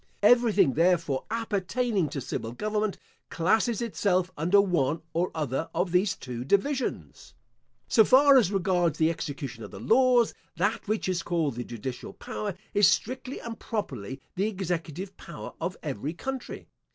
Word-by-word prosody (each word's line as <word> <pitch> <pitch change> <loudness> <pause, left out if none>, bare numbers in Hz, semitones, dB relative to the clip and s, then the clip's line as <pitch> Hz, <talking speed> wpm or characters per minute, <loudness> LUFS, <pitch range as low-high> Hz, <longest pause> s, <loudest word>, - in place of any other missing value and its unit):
Everything, 215 - +5
therefore, 165 -4 +2
appertaining 220 - -1
to 140 - -4
civil 115 -1 -4
government, 210 - -1 0.3
classes 220 +7 +1
itself 185 -5 0
under 175 +7 +3
one 165 -6 +1
or 175 +2 +1
other 150 0 -2
of 180 +1 0
these 185 +3 +2
two 125 -2 -6
divisions. 250 - -1 0.5
So 220 - +6
far 275 +5 +6
as 230 -8 +5
regards 180 -4 +1
the 160 +1 +3
execution 140 -7 -6
of - - -8
the 95 - -10
laws, 245 - +4 0.2
that 205 +6 0
which 215 -1 -1
is 185 -2 0
called 165 -6 0
the 120 +1 -4
judicial 120 +2 -6
power, 205 -4 -5 0.2
is 205 -2 +6
strictly 255 +2 -1
and 230 -1 -7
properly 135 - -4 0.2
the 195 +3 +1
executive 185 -2 -4
power - - -9
of 175 +2 -3
every 145 0 -3
country. 265 +4 -6
185 Hz, 150 wpm, -27 LUFS, 155-215 Hz, 0.5 s, So